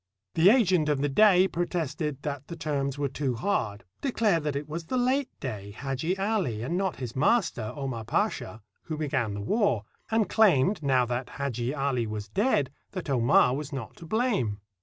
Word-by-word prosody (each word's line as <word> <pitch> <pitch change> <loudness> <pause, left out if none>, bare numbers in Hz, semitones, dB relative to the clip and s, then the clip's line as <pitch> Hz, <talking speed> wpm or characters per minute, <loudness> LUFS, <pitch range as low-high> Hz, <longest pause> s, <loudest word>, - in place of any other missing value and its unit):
The 165 +4 +6
agent 185 -10 +4
of 145 -2 +1
the 145 - +1
Dey 190 +4 +6
protested 155 -5 -2
that 145 -2 -4
the 170 - -6
terms 145 -3 -2
were 145 -1 0
too 135 -2 -2
hard; 115 - -1 0.2
declared 215 - +1
that 150 -2 -1
it 145 +1 -3
was 165 +2 -5
the 255 - -2
late 260 +2 +1
Dey, 105 -6 -5
Hadji 135 - -3
Ali, 195 - -1
and 150 +8 -2
not 190 -1 0
his 125 -3 -6
master, 145 - +1
Omar 135 -6 -4
Pasha, 110 0 -1 0.2
who 155 - -4
began 130 -8 -1
the 100 - -4
war; 125 - +1 0.3
and 220 -3 +2
claimed, 190 - +4
now 130 -3 +3
that 125 +1 -3
Hadji 130 -1 -2
Ah 140 -1 0
was 110 -4 -3
dead, 170 - +1 0.2
that 180 -7 -4
Omar 125 0 +4
was 145 0 -5
not 130 -6 -6
to 165 - -11
blame. 200 - 0
145 Hz, 180 wpm, -27 LUFS, 125-185 Hz, 0.3 s, The